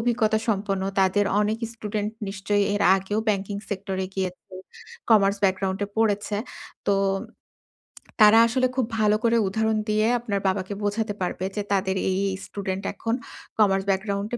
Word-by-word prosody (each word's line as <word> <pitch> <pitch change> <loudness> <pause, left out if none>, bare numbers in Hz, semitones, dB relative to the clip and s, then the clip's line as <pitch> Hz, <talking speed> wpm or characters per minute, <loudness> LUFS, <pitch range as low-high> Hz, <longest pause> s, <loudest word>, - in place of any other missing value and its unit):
অভিজ্ঞতা 225 -2 +2
সম্পন্ন। 195 -2 0 0.2
তাদের 195 +2 +3
অনেক 215 +1 0
স্টুডেন্ট 210 -1 -3 0.2
নিশ্চয়ই 200 +1 0
এর 205 - 0
আগেও 195 +2 -2
ব্যাংকিং 200 -1 -1
সেক্টরে 190 -1 -3
গিয়েছে। 185 -2 -3 0.7
কমার্স 200 -2 +5
ব্যাকগ্রাউন্ডে 190 +1 0
পড়েছে। 210 -1 +1 0.5
তো, 200 - +4 1.3
তারা 215 +1 +8
আসলে 255 +2 +1
খুব 260 -3 +1
ভালো 210 0 +4
করে 230 0 +3
উদাহরণ 220 +2 0
দিয়ে 215 +1 +2
আপনার 210 -4 -2
বাবাকে 190 +1 -1
বোঝাতে 205 +1 -1
পারবে। 180 +1 -2
যে, 210 - -1
তাদের 190 -1 +1 0.2
এই, 185 - 0
এই 190 - -3
স্টুডেন্ট 195 -1 -4
এখন 225 +2 -3 0.5
কমার্স 195 -2 +4
ব্যাকগ্রাউন্ডে 200 +3 -1
205 Hz, 140 wpm, -24 LUFS, 195-215 Hz, 1.3 s, তারা